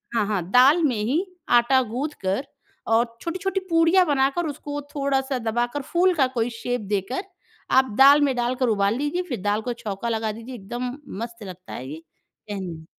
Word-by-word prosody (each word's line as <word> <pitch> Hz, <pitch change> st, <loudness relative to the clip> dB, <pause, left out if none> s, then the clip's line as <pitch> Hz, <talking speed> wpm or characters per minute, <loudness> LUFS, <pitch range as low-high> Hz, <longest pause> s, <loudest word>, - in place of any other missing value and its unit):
हाँ, 220 Hz, -3 st, +2 dB
हाँ। 200 Hz, -4 st, -1 dB
दाल 280 Hz, +7 st, +6 dB
में 265 Hz, -5 st, +2 dB
ही 250 Hz, -, 0 dB, 0.3 s
आटा 260 Hz, +2 st, +3 dB
गूँथ 275 Hz, +5 st, -1 dB, 0.2 s
कर 195 Hz, +8 st, 0 dB, 0.5 s
और 230 Hz, +2 st, +4 dB, 0.2 s
छोटी-छोटी 375 Hz, +3 st, -2 dB
पूड़ियाँ 330 Hz, +3 st, +4 dB
बनाकर 280 Hz, +3 st, +1 dB
उसको 290 Hz, 0 st, -5 dB, 0.2 s
थोड़ा-सा 275 Hz, -1 st, 0 dB
दबाकर, 240 Hz, +4 st, -1 dB
फूल 355 Hz, +6 st, +2 dB
का 270 Hz, -5 st, +3 dB
कोई 230 Hz, +1 st, +1 dB
शेप 245 Hz, -2 st, -2 dB
देकर, 205 Hz, -, -1 dB, 0.5 s
आप 260 Hz, 0 st, +4 dB
दाल 280 Hz, +2 st, +8 dB
में 275 Hz, -3 st, +2 dB
डालकर 245 Hz, +1 st, 0 dB
उबाल 200 Hz, 0 st, +2 dB
लीजिए 295 Hz, +6 st, -1 dB
फिर 235 Hz, -8 st, -3 dB
दाल 205 Hz, +1 st, 0 dB
को 245 Hz, +2 st, -3 dB
छौँका 225 Hz, -1 st, -4 dB
लगा 220 Hz, -1 st, -1 dB
दीजिए, 230 Hz, +4 st, -9 dB
एकदम 245 Hz, +5 st, -5 dB, 0.3 s
मस्त 230 Hz, -1 st, -8 dB
लगता 185 Hz, 0 st, -10 dB
है 130 Hz, -, -6 dB
ये। 155 Hz, +3 st, -7 dB, 0.5 s
कहने 175 Hz, -6 st, -6 dB
245 Hz, 175 wpm, -24 LUFS, 220-285 Hz, 0.5 s, दाल